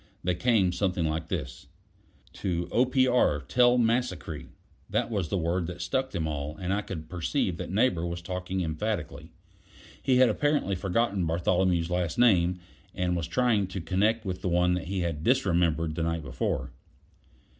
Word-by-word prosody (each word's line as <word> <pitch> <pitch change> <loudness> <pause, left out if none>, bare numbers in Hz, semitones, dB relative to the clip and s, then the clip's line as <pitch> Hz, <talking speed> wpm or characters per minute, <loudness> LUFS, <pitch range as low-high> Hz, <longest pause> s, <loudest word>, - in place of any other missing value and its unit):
They 90 - +1
came 100 -1 +2
something 90 -1 0
like 80 +1 -2
this: 65 -2 -5 0.7
"To 85 -3 -2
Opr. 125 - +2
Tell 125 +4 +4
Massacree" 115 -9 -1 0.4
that - - 0
was 95 -7 -1
the 100 - 0
word 85 0 -1
that 90 0 -7
stuck 130 +10 -1
them 85 -8 -3
all, 75 0 -4
and 90 +2 -2
I 100 - 0
could 80 -6 -7
perceive 80 -9 -1
that - - -5
Neighbor 95 -3 +2
was 85 0 -5
talking 90 +1 -3
emphatically. 80 -3 -3 0.7
He 130 -3 +3
had 130 0 +6
apparently 145 -2 +1
forgotten 95 0 0
Bartholomew's 85 +1 +1
last 90 -2 -1
name, 90 -7 +4 0.4
and 90 -1 0
was 85 -2 -2
trying 115 -6 +2
to 95 +1 -5
connect 105 +6 +1
with 95 -1 -4
the 90 - -1
one 90 +1 +2
he 95 +1 -3
had 80 -3 -3
"disremembered" 85 - +2
the 85 - -3
night 85 -1 -1
before. 70 - -2
90 Hz, 160 wpm, -28 LUFS, 85-105 Hz, 0.7 s, had